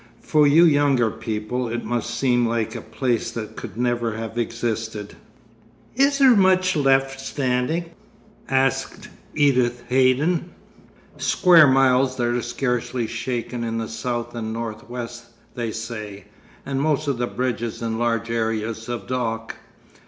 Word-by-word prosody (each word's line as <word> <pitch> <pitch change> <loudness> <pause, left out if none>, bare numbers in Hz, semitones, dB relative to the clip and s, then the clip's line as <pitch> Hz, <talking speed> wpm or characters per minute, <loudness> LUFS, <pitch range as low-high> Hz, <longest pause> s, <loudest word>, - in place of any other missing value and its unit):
For 150 -1 +4
you 160 +4 +6
younger 140 -7 +3
people 110 +2 -3
it 120 +1 -4
must 120 0 -2
seem 120 -1 +2
like 115 -1 -1
a - - -6
place 125 -4 -1
that 110 -2 -6
could - - -8
never 120 -2 0
have 115 0 -6
existed.' 115 -3 -3 0.8
'Is 275 +2 +3
there 265 -3 +6
much 185 -2 +3
left 135 -2 +2
standing?' 135 +5 -1 0.6
asked 135 0 0 0.3
Edith 125 -4 +2
Haydon. 135 +7 +2 0.7
'Square 175 -5 +6
miles 130 0 +3
that 120 -2 0
are 120 0 0
scarcely 125 -2 -2
shaken 120 +1 -4
in 115 -1 -2
the 115 -1 -3
south 120 +1 -4
and 110 -2 -4
north 115 -1 -6
west, 120 -1 -6 0.3
they 120 -2 -3
say; 110 -3 -7 0.4
and 135 0 -2
most 150 0 0
of 135 -4 -1
the 120 - 0
bridges 120 -2 -3
and 115 0 -2
large 115 -1 0
areas 110 0 -2
of 120 -1 -4
dock. 115 -3 -3
120 Hz, 140 wpm, -23 LUFS, 115-135 Hz, 0.8 s, you